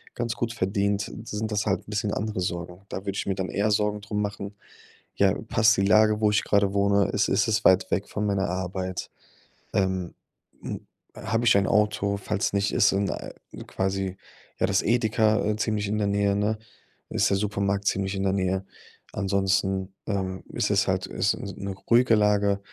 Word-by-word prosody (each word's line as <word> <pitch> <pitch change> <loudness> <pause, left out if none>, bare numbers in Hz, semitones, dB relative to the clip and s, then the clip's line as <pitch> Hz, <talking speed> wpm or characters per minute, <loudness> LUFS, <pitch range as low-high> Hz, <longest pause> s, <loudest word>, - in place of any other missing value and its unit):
ganz 120 -1 -2
gut 115 -1 -2
verdient, 100 -1 -1
sind 110 0 -4
das 105 -1 0
halt 95 -2 +1
'n - - -11
bisschen 105 0 -1
andere 105 -3 -2
Sorgen. 90 0 -4
Da - - -4
würde 100 - -3
ich - - -2
mir 95 - 0
dann 95 -1 -2
eher 105 +2 0
Sorgen 105 0 +1
drum 105 0 -3
machen: 100 0 -4 0.6
„Ja, - - +4 0.2
passt 110 0 +4
die 95 - +2
Lage, 110 +2 +4
wo 105 -1 +4
ich 105 - +2
gerade 100 -1 +2
wohne, 100 0 +3
ist 100 0 +1
ist 105 - +2
es 105 -1 +1
weit 95 0 +4
weg 100 - -1
von 105 - -2
meiner 100 -2 0
Arbeit? 95 0 -3 0.6
Ähm, 95 -2 0 0.5
hm, - - -6 0.3
habe 115 +3 -1
ich 110 - +6
ein 100 -1 +2
Auto, 105 -1 +1
falls 100 +1 -1
nicht, 100 0 +1
ist 110 -4 +5
so 95 - +1
'n, 100 0 0
äh, - - -5 0.3
quasi, 95 0 -2 0.4
ja - - +3
das 100 -1 +2
Edeka, 110 -1 +2
äh, 105 0 +1
ziemlich 105 -2 -1
in 105 - -1
der 105 - +1
Nähe, 100 0 +1
ne? 105 +2 0 0.5
Ist - - +2
der 100 - +3
Supermarkt 100 -1 -1
ziemlich 95 +1 0
in 95 - -2
der 95 -1 +1
Nähe? 95 0 0 0.5
Ansonsten, 95 -1 0
ähm, 95 -2 -2
ist - - 0
es - - +2
halt - - 0
ist - - 0
s 100 - -7
'ne 100 0 -4 0.2
ruhige 120 -1 +5
Lage?“ 105 -1 +2
100 Hz, 195 wpm, -26 LUFS, 95-105 Hz, 0.6 s, ich